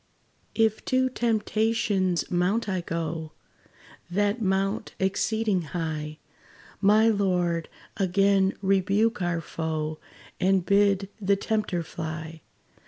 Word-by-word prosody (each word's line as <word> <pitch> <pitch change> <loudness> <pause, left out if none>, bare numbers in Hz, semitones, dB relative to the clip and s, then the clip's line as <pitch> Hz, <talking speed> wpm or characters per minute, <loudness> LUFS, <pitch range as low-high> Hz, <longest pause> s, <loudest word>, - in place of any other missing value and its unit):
If 220 -1 +2
to 260 0 +2
Temptation's 215 -5 0
mount 185 +6 +1
I 185 -3 -1
go, 165 -2 -4 0.8
That 205 +5 0
mount 195 +1 -1
exceeding 200 +1 0 0.2
high, 155 -2 -3 0.6
My 215 +2 +5
Lord, 180 -6 +1 0.3
again 195 0 +2
rebuke 195 +4 +2
our 175 -1 0
foe, 155 -1 -3 0.4
And 190 -1 +2
bid 200 -1 +3
the 200 0 +3
tempter 195 -4 -1
fly. 160 0 -6
190 Hz, 100 wpm, -26 LUFS, 170-210 Hz, 0.8 s, My